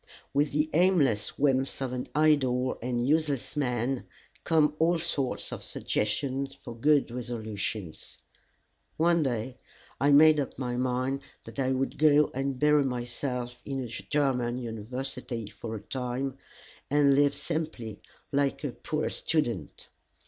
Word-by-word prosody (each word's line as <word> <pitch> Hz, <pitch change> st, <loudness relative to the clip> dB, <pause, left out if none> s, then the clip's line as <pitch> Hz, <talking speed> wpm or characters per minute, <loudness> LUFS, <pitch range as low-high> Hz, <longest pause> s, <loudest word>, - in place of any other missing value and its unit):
With 145 Hz, +1 st, +2 dB
the 150 Hz, +2 st, +1 dB
aimless 150 Hz, -, +3 dB
whims 135 Hz, -1 st, +1 dB
of 130 Hz, -2 st, -2 dB
an 125 Hz, 0 st, -3 dB
idle 130 Hz, -5 st, +3 dB
and 120 Hz, 0 st, -1 dB
useless 150 Hz, -3 st, +1 dB
man 125 Hz, -2 st, -1 dB, 0.4 s
come 150 Hz, -2 st, +3 dB
all 170 Hz, +2 st, +4 dB
sorts 150 Hz, -6 st, -1 dB
of -, -, -5 dB
suggestions 135 Hz, +5 st, -2 dB
for 120 Hz, -3 st, -9 dB
good 145 Hz, +1 st, +3 dB
resolutions. 110 Hz, -6 st, -5 dB, 0.8 s
One 170 Hz, +1 st, +4 dB
day 125 Hz, -2 st, -2 dB, 0.4 s
I 140 Hz, -, +3 dB
made 155 Hz, +1 st, +7 dB
up 140 Hz, -, -3 dB
my 125 Hz, -1 st, -2 dB
mind 130 Hz, +2 st, 0 dB, 0.2 s
that -, -, -9 dB
I 130 Hz, -1 st, +1 dB
would 130 Hz, +1 st, -1 dB
go 150 Hz, -1 st, +5 dB
and 135 Hz, 0 st, -2 dB
bury 150 Hz, +1 st, +4 dB
myself 125 Hz, -1 st, -3 dB
in 135 Hz, -1 st, -3 dB
a -, -, -5 dB
German 125 Hz, -1 st, 0 dB
university 120 Hz, +1 st, -4 dB
for 115 Hz, -1 st, -6 dB
a 105 Hz, -, -6 dB
time, 130 Hz, +3 st, -3 dB, 0.5 s
and 145 Hz, -1 st, +5 dB
live 145 Hz, 0 st, +4 dB
simply 140 Hz, -8 st, -4 dB, 0.3 s
like 140 Hz, +1 st, +1 dB
a 145 Hz, -, -1 dB
poor 155 Hz, +5 st, -2 dB
student. 120 Hz, -, -1 dB
135 Hz, 135 wpm, -29 LUFS, 120-145 Hz, 0.8 s, made